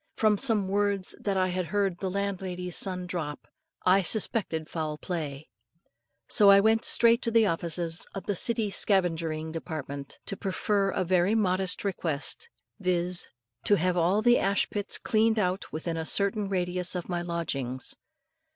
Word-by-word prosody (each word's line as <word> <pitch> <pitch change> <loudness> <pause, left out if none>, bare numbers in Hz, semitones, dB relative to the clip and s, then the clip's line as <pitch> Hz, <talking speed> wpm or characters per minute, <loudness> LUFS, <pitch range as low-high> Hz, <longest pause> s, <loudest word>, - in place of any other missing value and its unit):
From 215 -1 +3
some 215 -4 +1
words 200 -1 0
that 200 -2 -1
I 185 0 +2
had 180 0 -2
heard 195 -3 -1
the 190 - -2
landlady's 185 -2 -3
son 185 -2 -2
drop, 160 -5 -5 0.4
I 185 +2 +5
suspected 190 -5 +1
foul 155 -3 -4
play; 155 -4 -5 0.8
so 205 -1 +6
I 200 0 +8
went 220 +2 +3
straight 235 0 +5
to - - 0
the 230 -1 +4
offices 170 -1 -2
of 195 - -6
the 205 - -1
City 225 +1 +2
Scavengering 165 -6 +1
Department 145 -4 -6
to 195 - -2
prefer 195 +1 0
a 190 - -1
very 185 +4 +2
modest 190 -2 +1
request, 180 - -3 0.3
viz., 180 -1 +1 0.4
to 205 - +5
have 180 0 0
all 180 +5 +2
the 240 +1 +5
ashpits 200 +1 0
cleaned 220 0 +1
out 185 -2 -1
within 165 +1 -4
a 160 - -3
certain 200 0 0
radius 180 -1 -1
of 180 - -4
my 175 -1 -2
lodgings. 140 -7 -3
185 Hz, 155 wpm, -28 LUFS, 170-200 Hz, 0.8 s, I